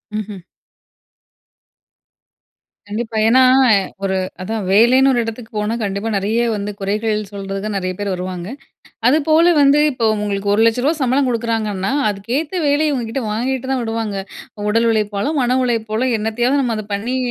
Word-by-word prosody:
ம்ஹ்ம். 210 -2 -5 2.5
கண்டிப்பா, 220 +2 -4
ஏன்னா, 255 +3 +5 0.6
ஒரு 190 -1 0 0.2
அதான் 215 +2 -3
வேலைன்னு 245 +6 +5
ஒரு 240 - +2
எடத்துக்கு 225 0 -7
போனா, 210 +2 -1
கண்டிப்பா 200 +2 -2
நிறைய 215 +4 0
வந்து, 205 0 -4
குறைகள் 210 +2 -1
சொல்றதுக்கு, 195 +1 -5
நிறைய 185 -1 -2
பேர் 200 -2 -2
வருவாங்க! 180 -1 -5 0.6
அதுபோல 315 +4 +4
வந்து, 280 +1 +5
இப்ப 235 -3 0
உங்களுக்கு 205 -1 -1
ரூ.1,00,000 230 +7 +2
சம்பளம் 260 +1 +2
குடுக்குறாங்கன்னா, 220 -4 -2 0.2
அதுக்கேத்த 275 - -3
வேலைய, 295 +1 +2
உங்ககிட்ட 235 +1 -3
வாங்கிட்டு 260 +4 -2
தான் 260 -2 -1
விடுவாங்க. 225 -3 -3 0.5
உடல் 230 +2 +2
உழைப்பாலும், 215 +7 -1
மன 250 +1 +1
உழைப்பாலோ, 230 0 -1
என்னத்தையாவது 240 +6 0
நம்ம 235 -3 -1
அதை 215 -1 -6
பண்ணி 230 +6 -2
225 Hz, 130 wpm, -18 LUFS, 205-250 Hz, 2.5 s, ஏன்னா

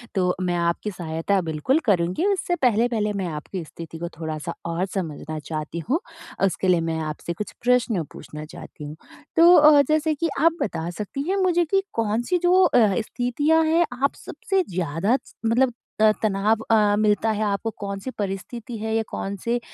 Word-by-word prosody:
तो 180 -1 +2
मैं 175 -1 0
आपकी 170 +5 -1
सहायता 170 +2 -1
बिल्कुल 165 - 0
करुँगी। 185 - +1
उससे 380 -3 +1
पहले-पहले 230 -5 +1
मैं 190 -3 -2
आपकी 165 +4 -5
स्थिति 165 +1 -9
को 170 +1 -5
थोड़ा-सा 155 -2 -4
और 170 +2 -1
समझना 155 -5 -5
चाहती 155 +2 -5
हूँ। 315 +6 +2 0.5
उसके 190 0 -1
लिए 175 -2 +4
मैं 160 - -2
आपसे 155 +3 -4
कुछ 210 +4 -6
प्रश्न 240 -7 +2
पूछना 150 +1 -9
चाहती 150 0 -11
हूँ। 150 +1 -7 0.4
तो 340 +2 +8
अ, 300 -1 +8
जैसे 310 0 +1
कि 330 +3 -1
आप 330 +1 +3
बता 170 -4 -2
सकती 245 +7 -4
हैं 395 - +1
मुझे 350 -2 +3
कि 390 +4 +2
कौन-सी 230 - 0
जो 365 +1 +5
अ, - - +3 0.2
स्थितियाँ 290 +8 +1
हैं, 330 +2 +3 0.2
आप 280 - +2
सबसे 385 -1 -1
ज़्यादा 175 - 0
च - - -19
मतलब 245 +2 +3 0.3
अ, 215 0 +7
तनाव 215 +1 +1
अ, 210 -2 +4
मिलता 215 +1 +2
है 215 0 -1
आपको? 205 +2 -1
कौन-सी 200 +4 -5
परिस्थिति 215 +4 -4
है 220 +1 -3
या 225 - +1
कौन-से 215 +5 -2
210 Hz, 175 wpm, -23 LUFS, 170-260 Hz, 0.5 s, तो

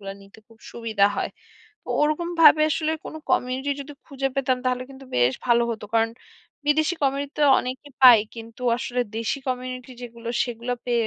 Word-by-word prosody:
গুলো 195 -1 -6
নিতে 195 +2 -17
খুব 225 -1 -20
সুবিধা 220 -4 0
হয়। - - -2 0.5
তো - - -16
ওরকমভাবে 310 0 +4
আসলে 315 +1 0
কোনো 315 - -7
কমিউনিটি 260 +3 0
যদি 290 +1 -8
খুঁজে 270 -1 -2
পেতাম 260 -2 +1
তাহলে 250 0 0
কিন্তু 270 0 -12
বেশ 125 +1 +4
ভালো 235 -1 +4
হতো 220 -2 -5
কারণ 225 0 +3 0.6
বিদেশি 310 +3 +2
কমিউনিটিতে 280 +2 -1 0.2
অনেকেই 260 +3 -6
পায় 240 -4 +10
কিন্তু 230 +2 -10
আসলে 250 0 -2 0.2
দেশি 230 +5 -1
কমিউনিটি 255 0 -4
যেগুলো 235 -1 -8 0.2
সেগুলো 240 0 -4
পেয়ে 235 -2 +1
255 Hz, 165 wpm, -24 LUFS, 230-280 Hz, 0.6 s, পায়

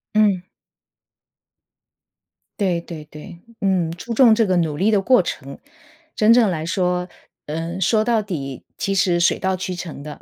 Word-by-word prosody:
嗯。 200 -4 +2 2.1
对 180 -4 0
对 160 -3 -9
对。 160 +4 -11 0.2
嗯， 185 -4 +1
注 200 +8 -6
重 230 -1 +6
这 225 -1 +3
个 185 -2 +1
努 160 -3 0
力 195 +6 +2
的 205 - +3
过 250 +1 +4
程， 140 -5 -6 0.6
真 220 +2 +5
正 235 -4 +4
来 160 -3 -3
说， 180 0 -1 0.4
呃， 165 +4 -4
说 215 +4 +2
到 225 -1 +1
底 140 - -6
其 195 -1 -1
实 180 -2 +2
水 170 - +3
到 190 0 0
渠 185 0 -4
成 170 -5 -7
的。 150 0 -9
180 Hz, 170 characters per minute, -21 LUFS, 165-205 Hz, 2.1 s, 重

